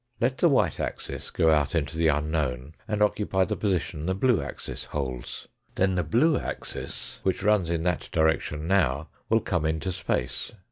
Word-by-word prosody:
Let 130 +2 +1
the 170 - +5
white 105 - +2
axis - - -4
go 80 - +3
out 75 0 +2
into 80 -1 -1
the 80 0 +2
unknown, 75 -3 0
and 105 0 +2
occupy 100 -2 +2
the - - -2
position 90 -5 -1
the 95 - +1
blue 120 +2 +3
axis - - -6
holds. 65 -4 -4 0.3
Then 95 0 +2
the 90 - +1
blue 120 - +3
axis, - - -5
which 95 0 0
runs 105 -5 +3
in 85 -1 0
that 90 -2 -1
direction 80 -1 +1
now 80 -6 +2 0.2
will 115 0 +4
come 90 -6 -1
into 80 +4 -1
space. 90 - -2
85 Hz, 175 wpm, -27 LUFS, 75-100 Hz, 0.3 s, the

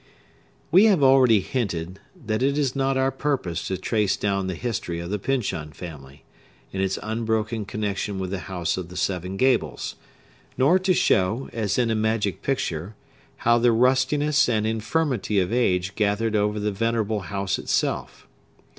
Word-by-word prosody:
We 190 +5 +7
have 195 -9 +4
already 130 -5 +6
hinted 95 -7 -3 0.3
that 110 +1 -1
it 140 +2 +1
is 140 -3 0
not 135 0 +1
our 130 0 +2
purpose 135 - -2
to 95 - -2
trace 105 +1 0
down 100 -2 -1
the 95 - -3
history 100 -6 -3
of 85 +2 -6
the 105 - -1
Pyncheon 100 - -2
family, 70 -4 -10 0.5
in 95 - -2
its 95 0 0
unbroken 110 0 -1
connection 105 -1 -3
with 95 -1 -4
the 100 - -2
House 90 -2 -1
of 90 -2 -5
the 90 - -9
Seven 90 +1 -2
Gables; 90 - +1 0.6
nor 145 +9 +4
to 185 -1 +2
show, 100 +8 +1
as 110 -4 -1
in 120 -2 +2
a - - +1
magic 110 -3 0
picture, 100 - -2 0.5
how 120 0 +5
the 120 0 +4
rustiness 135 +4 +3
and 110 -2 +1
infirmity 110 -1 0
of 95 +4 0
age 95 -6 +1
gathered 110 +1 0
over 105 0 +1
the 105 0 -1
venerable 110 0 0
house 100 +1 -2
itself. - - -2
110 Hz, 165 wpm, -24 LUFS, 95-125 Hz, 0.6 s, We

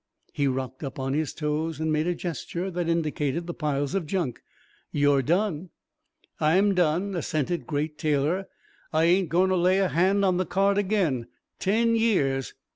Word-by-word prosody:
He 145 -2 +1
rocked 130 +1 -3
up 135 - -5
on 135 0 -2
his 155 0 -1
toes 155 0 -2
and 160 0 0
made 155 +2 +1
a 175 - 0
gesture 175 +2 -4
that 175 -1 -2
indicated 160 -1 -1
the 175 - -5
piles 145 -3 -2
of 190 -5 -1
junk. 165 - -2 0.5
"You're 145 -1 +3
done." 175 - 0 0.7
"I'm 185 +6 +3
done," 180 +2 +1
assented 165 0 -2
Great 150 0 -2
Taylor. 155 +6 0 0.4
"I 160 +1 +2
ain't 175 +1 +3
going 185 +3 +3
to - - +3
lay 185 +1 +3
a 195 -2 +2
hand 195 +4 +2
on 185 -2 +2
the 185 - 0
cart 195 +3 +2
again. 185 - 0 0.3
Ten 230 +4 +2
years...." 145 - +1
165 Hz, 170 wpm, -26 LUFS, 150-185 Hz, 0.7 s, You're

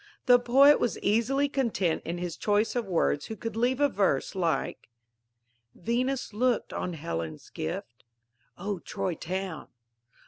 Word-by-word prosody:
The 245 -1 +7
poet 275 +4 +6
was 240 - 0
easily 235 +7 +2
content 230 - 0
in 170 +1 -3
his 175 -2 -4
choice 210 +3 +1
of 235 -4 -1
words 165 -5 +1
who 220 - -5
could 225 -1 -5
leave 245 +3 +1
a 290 - +5
verse 195 - 0
like: 170 -9 -1 0.9
Venus 245 +4 -1
looked 245 +2 0
on 180 - -3
Helen's 80 - -5
gift; 115 +9 -5 0.5
_(O 195 -1 -4
Troy 185 - -2
Town!) 180 0 -4
205 Hz, 140 wpm, -28 LUFS, 170-245 Hz, 0.9 s, The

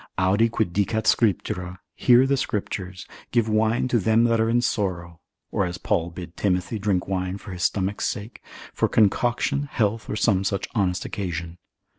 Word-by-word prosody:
Audi 100 +5 +3
quid 110 -6 -1
dicat 105 +3 0
Scriptura, 90 -4 +1 0.2
hear 125 +1 +5
the 140 +1 +2
Scriptures, 95 -6 -4 0.2
Give 115 -2 +1
wine 110 +3 +1
to 120 - +2
them 110 +3 +3
that 115 -1 +3
are 115 - +2
in 120 +1 +3
sorrow, 90 -9 -2 0.3
or 100 - +1
as 90 -1 -3
Paul 85 -1 0
bid 85 0 -9
Timothy 95 +2 -1
drink 100 -3 0
wine 95 0 -2
for 100 - -10
his 90 -1 -6
stomach's 100 +1 0
sake, 105 0 -6 0.3
for - - +1
concoction, 120 +6 +2
health, 110 -1 -1
or - - -2
some 105 -3 +2
such 100 0 -1
honest 95 -5 0
occasion. 85 -4 -5
100 Hz, 170 wpm, -24 LUFS, 90-115 Hz, 0.3 s, hear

